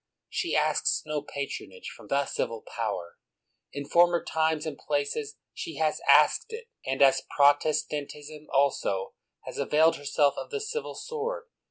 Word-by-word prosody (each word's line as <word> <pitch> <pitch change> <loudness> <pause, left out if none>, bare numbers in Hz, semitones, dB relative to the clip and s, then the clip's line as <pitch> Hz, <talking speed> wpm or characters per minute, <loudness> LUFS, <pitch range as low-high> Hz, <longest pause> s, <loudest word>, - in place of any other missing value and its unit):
She - - -1
asks - - +2
no 150 -1 -2
patronage 140 -10 -6
from - - -14
the 140 +6 +2
ci^al 115 -4 -3
power; 100 -7 -4 0.5
in 140 0 -5
former 175 +3 +4
times 160 -1 0
and 155 -2 -4
places 150 - -2 0.2
she - - -6
has - - 0
asked 455 - +5
it, 460 +1 -8
and, 135 +1 +2
as 135 -1 +5
Protestantism 150 +1 +1
also, 130 -9 +1 0.3
has - - -7
availed 160 +2 +3
herself 145 0 +2
of - - -7
the 435 - -3
civil 460 +2 -4
sword. 470 +1 -4
150 Hz, 145 wpm, -28 LUFS, 140-170 Hz, 0.5 s, asked